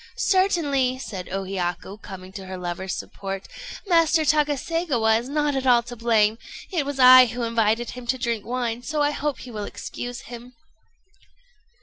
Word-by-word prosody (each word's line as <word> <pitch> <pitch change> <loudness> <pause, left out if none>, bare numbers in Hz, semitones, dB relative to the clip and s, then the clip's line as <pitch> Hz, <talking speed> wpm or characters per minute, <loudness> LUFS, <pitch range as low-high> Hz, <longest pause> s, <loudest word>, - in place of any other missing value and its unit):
"Certainly," 295 -10 +2
said 195 -8 -7
O 195 +1 -3
Hiyaku, 190 +1 -4
coming 185 -1 -10
to 190 -1 -9
her 185 0 -6
lover's 180 +1 -4
support, 195 -1 -6 0.4
"Master 330 -3 +3
Takaségawa 290 -5 +1
is 240 +3 -8
not 295 -1 0
at 265 -1 -1
all 240 -2 +5
to 245 +1 -8
blame. 225 -1 +2 0.3
It 315 -7 -1
was 285 -1 -4
I 255 -1 +9
who 240 +1 -4
invited 230 0 +1
him 250 -1 -9
to 260 +2 +1
drink 235 -4 -2
wine; 240 -1 -3
so 295 +3 -1
I 290 - +2
hope 295 -1 -3
you 245 - -10
will 210 -1 -4
excuse 245 +3 -7
him." 240 +1 -11
245 Hz, 165 wpm, -24 LUFS, 215-285 Hz, 0.4 s, I